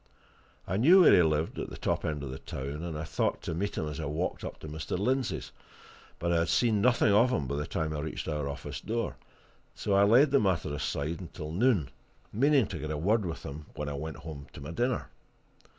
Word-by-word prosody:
I 95 - -1
knew 170 - +7
where - - +8
he - - +7
lived, 80 -1 0
at - - -4
the - - -8
top - - -1
end 75 -2 -2
of 65 - -5
the 65 - -7
town, 70 +4 -5
and 85 -3 -4
I 75 - -3
thought - - -1
to - - -3
meet 100 +5 -2
him 80 - -1
as 75 -1 -5
I 80 - -3
walked 75 +6 -2
up - - -6
to - - -7
Mr. 80 +3 -4
Lindsey's; 100 - -1 0.7
but 85 0 -1
I 85 - +3
had 85 - 0
seen 110 -4 +3
nothing 120 -2 +4
of 115 +5 +5
him 80 - 0
by 65 - -3
the 75 - -3
time 80 -1 -2
I - - -3
reached 80 +1 -4
our 75 -3 -2
office 70 - -6
door, 115 +1 -2 0.6
so 100 - -1
I 100 - +5
laid 120 +8 +6
the 140 - +5
matter 85 - 0
aside 75 +2 -2
until 80 -3 -7
noon, 100 - +2 0.4
meaning 140 +2 +4
to 90 -5 -6
get 75 - -4
a 75 - -2
word 100 +5 +1
with 80 - -5
him 75 +2 -7
when 75 0 -3
I - - -4
went 75 +1 -5
home 75 -3 -8
to - - -10
my 70 +4 -6
dinner. 120 +7 -1
80 Hz, 235 wpm, -30 LUFS, 75-105 Hz, 0.7 s, where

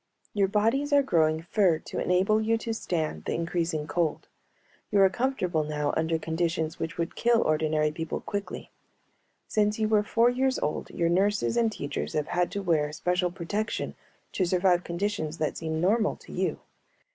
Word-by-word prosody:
"Your 200 -2 +2
bodies 225 +9 +1
are 285 -1 +5
growing 160 -8 +2
fur 180 -2 +2
to - - -6
enable 190 +4 +2
you 225 +1 +2
to 225 0 -3
stand 160 - -3
the - - -1
increasing 165 -2 -1
cold. 160 +1 -1 0.6
You 205 - +2
are 195 - +7
comfortable 190 -10 0
now 150 -1 -1
under 160 0 +1
conditions 160 0 -2
which 165 0 -4
would 170 0 -2
kill 235 -1 +3
ordinary 155 0 +1
people 165 0 -4
quickly. 200 -1 -5 0.8
Since 210 0 +1
you 220 -1 +1
were 215 -1 +4
four 230 +3 +3
years 260 +1 +1
old 150 - -2
your 170 -1 0
nurses 200 +5 +2
and 230 -2 +2
teachers 145 -8 -4
have 150 -1 -1
had 175 0 +1
to 200 -1 -3
wear 155 -4 +1
special 180 +3 0
protection 195 +5 -3 0.4
to 190 - 0
survive 180 0 +2
conditions 170 -3 -2
that 155 - -1
seem 160 -1 -2
normal 210 +6 +2
to - - -15
you. - - -2
180 Hz, 170 wpm, -27 LUFS, 160-210 Hz, 0.8 s, are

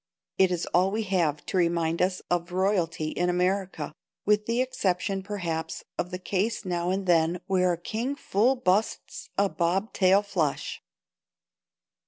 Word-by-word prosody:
It 190 -1 +6
is 180 -1 -1
all 180 +2 +4
we 220 +3 -1
have 165 -7 0
to - - -2
remind 170 -1 +1
us 185 0 0
of 175 0 0
royalty 180 -4 0
in 175 +3 0
America, 180 -2 -1 0.3
with 210 0 +2
the 230 +1 +1
exception, 195 -6 0
perhaps, 170 -5 -4 0.2
of 175 - -1
the 180 - -4
case 200 +4 -1
now 175 -1 -1
and 190 +1 -1
then 170 0 +3
where 185 -2 +2
a - - -3
king 230 +10 -3
full 245 0 +2
busts 215 -3 -1
a 200 +1 +4
bob 190 +4 -1
tail 190 +1 +4
flush. 175 -8 -2
185 Hz, 155 wpm, -27 LUFS, 175-200 Hz, 0.3 s, It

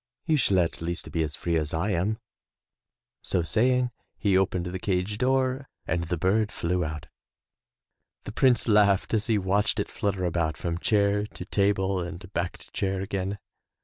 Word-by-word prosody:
You 160 -3 +3
shall 110 -9 +3
at 85 -2 +1
least 85 +1 -4
be 80 - 0
as 75 -2 -2
free 85 -1 0
as 75 0 -1
I 95 +6 0
am.'* 100 +4 0 1.0
So 90 - 0
saying, 125 +6 +2 0.3
he 100 -3 +2
opened 95 -2 +1
the 90 +1 -4
cage 95 +2 -1
door 130 +1 +1 0.2
and 85 +1 -1
the 90 +1 -2
bird 105 +5 +2
flew 90 +1 -1
out. 75 -2 -5 1.2
The - - -6
Prince 125 -3 +3
laughed 105 -2 +4
as 110 -1 +1
he 110 -2 +3
watched 100 +1 +1
it - - -2
flutter 100 -3 -1
about 80 -3 0
from 85 +2 -3
chair 105 0 +2
to - - -9
table 100 -1 +1
and 90 +1 -7
back 85 0 -2
to - - -18
chair 95 -1 -1
again. 95 +1 -2
95 Hz, 175 wpm, -27 LUFS, 85-105 Hz, 1.2 s, laughed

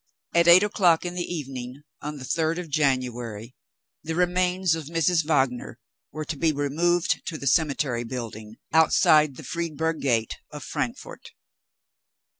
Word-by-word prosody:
At 170 0 +4
eight 175 +3 +8
o'clock 180 -5 +2
in 175 - -3
the 175 -1 -4
evening, 135 -4 -6 0.2
on 150 +1 -5
the 130 - -8
third 160 +4 0
of 180 -3 -6
January, 125 -5 -1 0.5
the 160 +1 -4
remains 180 0 +1
of 160 -2 -4
Mrs. 165 +2 +1
Wagner 135 -5 0 0.3
were 155 0 -5
to 155 - -4
be 160 +2 +2
removed 160 +4 0
to 160 - -4
the 140 - -8
cemetery 140 -5 +1
building, 115 -3 -7 0.2
outside 155 -2 +4
the - - -10
Friedberg 160 -2 -3
Gate 115 -5 0
of - - -9
Frankfort. - - -5
155 Hz, 145 wpm, -25 LUFS, 130-170 Hz, 0.5 s, eight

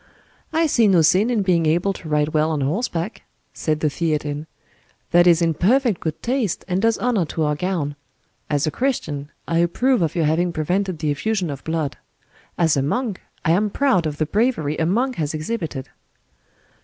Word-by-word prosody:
"I 325 +1 +2
see 235 -7 +3
no 180 -5 +5
sin 185 +8 +4
in 225 -5 +1
being 170 -4 +2
able 175 +5 +2
to 165 - -9
ride 150 0 +2
well 155 0 +1
on 155 -3 -1
horseback," 170 - -2 0.3
said 155 -1 -1
the 155 - +2
Theatin; 150 -1 -2 0.6
"that 175 +1 +5
is 170 -1 +5
in 165 -1 +2
perfect 230 - +2
good 160 -1 -4
taste, 240 -6 -1
and 185 0 0
does 225 0 +2
honor 235 -6 +1
to 160 +1 -2
our 150 0 +1
gown. 150 -3 -2 0.5
As 145 -2 +1
a 155 - 0
Christian, 150 - -2 0.2
I 165 0 +1
approve 235 +8 +2
of 165 0 0
your 165 -3 +1
having 170 +3 +1
prevented 180 +3 -1
the 150 -1 -1
effusion 185 +2 -1
of 140 -1 -7
blood; 160 -3 -2 0.6
as 165 -3 +3
a 140 - +1
monk, 210 - -2 0.2
I 165 - +3
am 205 +5 +2
proud 200 - +2
of 150 -1 -4
the 155 - +1
bravery 180 - 0
a 160 - +1
monk 245 +8 0
has 155 -1 -2
exhibited." 155 - -4
170 Hz, 190 wpm, -21 LUFS, 155-210 Hz, 0.6 s, no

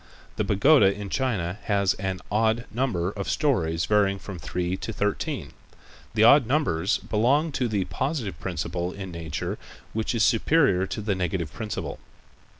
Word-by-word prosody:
The - - +1
pagoda 100 0 +5
in 100 -1 -6
China 105 -8 -1
has 100 -2 +2
an 95 -2 -4
odd 110 +2 +2
number 105 -8 -1
of 100 -1 -5
stories 85 - +1
varying 100 -2 +2
from 95 -2 -8
three 90 +5 -2
to 95 +4 -5
thirteen. 105 -1 -2 0.6
The 110 - +4
odd 125 +1 +7
numbers 105 - +1
belong 135 +9 +1
to 130 -3 0
the 100 -4 -1
positive 130 - -3
principle 85 0 -3
in 95 -2 -7
nature 80 -3 -4 0.3
which 110 +2 -1
is 115 - +2
superior 115 - +3
to 105 - -4
the 105 -1 0
negative 90 -4 -2
principle. 110 -2 -5
100 Hz, 150 wpm, -25 LUFS, 90-115 Hz, 0.6 s, odd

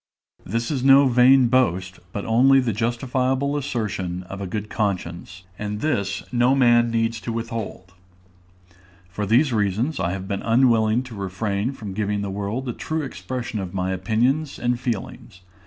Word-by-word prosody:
This 115 +6 -2
is 135 -4 -2
no 135 +1 +7
vain 125 +1 +6
boast, 95 -7 +1
but 100 - -5
only 130 +4 +5
the 125 -4 0
justifiable 130 +5 0
assertion 105 -10 -3
of 100 +2 -8
a 95 - -3
good 105 +2 -4
conscience; 90 -3 -3 0.2
and 105 0 -3
this 100 -10 -1
no 125 +2 +3
man 120 -3 +4
needs 115 -1 -1
to 115 - -4
withhold. 115 -5 -5 1.2
For 100 +3 -4
these 125 +5 +3
reasons, 110 +8 0
I 90 -1 0
have 95 0 -5
been 100 -1 -3
unwilling 115 -1 +3
to 125 -2 -11
refrain 100 +3 -2
from 105 -7 -7
giving 105 0 -1
to - - -3
the 100 - -3
world 105 +7 -3
a 120 - -2
true 155 +5 -3
expression 125 -4 -5
of 95 -1 -6
my 95 0 -1
opinions 120 - 0
and 120 0 -1
feelings. 110 -6 -5
115 Hz, 165 wpm, -23 LUFS, 100-125 Hz, 1.2 s, no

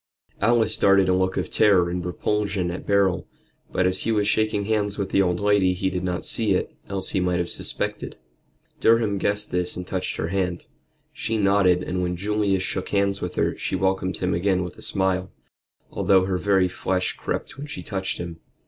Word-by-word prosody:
Alice 115 -1 +4
darted 100 -1 +4
a 90 - +3
look 95 0 0
of - - -2
terror 95 -4 +4
and 90 0 -3
repulsion 95 0 -1
at 90 - -7
Beryl, 100 -2 +2 0.4
but 90 - +1
as 95 0 +2
he 115 - 0
was 105 -2 +1
shaking 110 -1 +1
hands 105 -2 0
with 100 -2 -3
the 100 - +4
old 90 -2 +1
lady 100 -2 +3
he 95 +1 -1
did 90 0 -3
not 90 -1 -2
see - - +3
it, - - -3
else 95 -1 -1
he - - 0
might 90 -1 +1
have 85 0 -2
suspected. - - -2 0.6
Durham 110 -3 +3
guessed 105 +2 0
this 90 0 0
and 90 - -5
touched 95 0 -3
her 80 - -3
hand. 90 -2 -2 0.5
She 115 - -2
nodded, 100 -3 +3
and 90 0 -2
when 90 0 -2
Julius 100 -1 0
shook 95 0 -2
hands 100 -1 +1
with 90 - -4
her - - 0
she - - -2
welcomed 95 0 0
him 90 0 -1
again 90 +1 +1
with 90 - -7
a - - -11
smile, 95 -2 0 0.6
although 95 -1 +3
her 95 -1 -1
very 95 -2 +3
flesh 90 +1 -1
crept - - -5
when 145 - -6
she 150 - -7
touched 95 -2 -3
him. 85 -1 -7
95 Hz, 200 wpm, -24 LUFS, 90-100 Hz, 0.6 s, Alice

